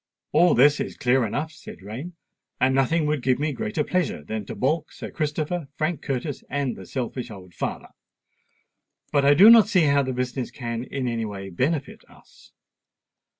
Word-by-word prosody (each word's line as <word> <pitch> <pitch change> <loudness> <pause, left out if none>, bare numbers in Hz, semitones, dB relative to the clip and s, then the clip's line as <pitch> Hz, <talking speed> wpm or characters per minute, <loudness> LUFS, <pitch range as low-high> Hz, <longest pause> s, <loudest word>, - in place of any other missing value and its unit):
"All 175 +1 +5
this 145 +4 +5
is - - -4
clear 125 -3 +2
enough," 150 +9 -3
said 150 - -12
Rain; 125 - -7 0.5
"and 130 0 +3
nothing 145 +5 +2
would 150 -2 0
give 130 0 +2
me 150 +1 -1
greater 215 -8 -2
pleasure 175 - -1
than 105 +4 -5
to - - -6
baulk 155 +5 -1
Sir - - -8
Christopher, 155 +1 -2
Frank 155 +1 -1
Curtis, 135 +1 -4
and 140 -2 -1
the 95 - -11
selfish 125 +1 -4
old 95 -4 -11
father. - - -4 1.2
But 140 -1 +2
I 145 +1 +6
do 195 +8 +8
not 225 -3 +8
see 190 -5 +3
how 140 -1 +4
the 130 -1 -2
business 125 0 -3
can 120 -2 -5
in 130 -2 -3
any 115 -2 -2
way 100 -2 -6
benefit 140 - -2
us." - - -20
135 Hz, 180 wpm, -24 LUFS, 120-155 Hz, 1.2 s, do